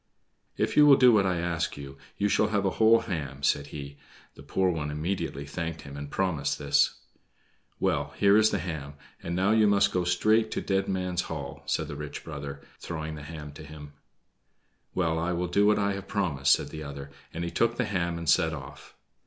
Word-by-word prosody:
"If - - 0
you 150 0 +7
will 140 - +9
do 125 -2 +6
what 100 -4 +4
I 90 -2 0
ask 85 -2 -2
you, 70 -1 -8 0.2
you 105 - +1
shall 105 +1 +2
have 105 -2 0
a 95 - +2
whole 115 +1 +6
ham," 70 -8 -5
said 70 0 +1
he. 70 -1 -8 0.4
The - - -14
poor 95 -1 +1
one 75 -3 -3
immediately 75 -2 -3
thanked 80 +2 -5
him 70 0 -9
and 70 0 -6
promised 80 -7 -1
this. 70 -1 +2 0.8
"Well, - - 0
here 100 0 +5
is 110 0 +5
the 100 - 0
ham, 80 -5 -5 0.3
and 85 - -4
now 95 +3 +2
you 110 -1 +5
must 100 -1 +4
go 90 - 0
straight 110 +6 +2
to - - -1
Dead 95 0 0
Man's 90 -2 -1
Hall," - - -6
said - - 0
the - - -6
rich 75 0 -7
brother, 70 -3 -7 0.2
throwing 80 -2 -5
the 75 - -8
ham 75 0 -8
to 75 +2 -11
him. 75 -1 -11 1.0
"Well, 80 -3 +1
I 85 +2 -1
will 90 +1 -1
do 100 +4 +3
what 105 - +4
I 100 -1 +1
have 100 0 -7
promised," 85 -10 +2
said - - -1
the 80 - -7
other, 70 -1 -8 0.2
and 85 - -4
he 85 - -3
took 115 0 +1
the 125 - 0
ham 85 -5 -1
and 85 -1 -6
set 80 +2 +3
off. 70 -2 -10
85 Hz, 210 wpm, -28 LUFS, 75-100 Hz, 1.0 s, will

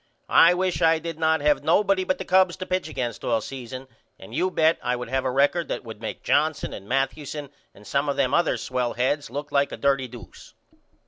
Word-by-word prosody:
I 170 +2 +7
wish 185 0 -1
I 165 -1 +5
did 165 0 -6
not 160 -1 +2
have 150 0 +2
nobody 195 +3 +3
but 185 - 0
the 190 - -6
Cubs 185 -1 +3
to 185 - -5
pitch 185 -4 -2
against 120 -6 -4
all 115 -2 +1
season 130 +2 -8 0.3
and 95 +4 -13
you 175 +7 +1
bet 160 -2 +2
I 125 0 0
would 125 -1 -6
have 130 +1 -1
a - - +1
record 145 +6 +2
that - - -4
would 110 -2 -10
make 110 - -6
Johnson 155 +1 +1
and 100 - -10
Mathewson 140 +2 -2 0.2
and 105 - -16
some 140 +4 0
of 140 - -1
them 135 -1 +1
other 170 - +2
swell 125 -2 -2
heads 130 +3 -1
look 145 +4 -6
like 140 0 +2
a - - -6
dirty 140 -2 +1
doose. 115 - -13
140 Hz, 220 wpm, -24 LUFS, 125-165 Hz, 0.3 s, I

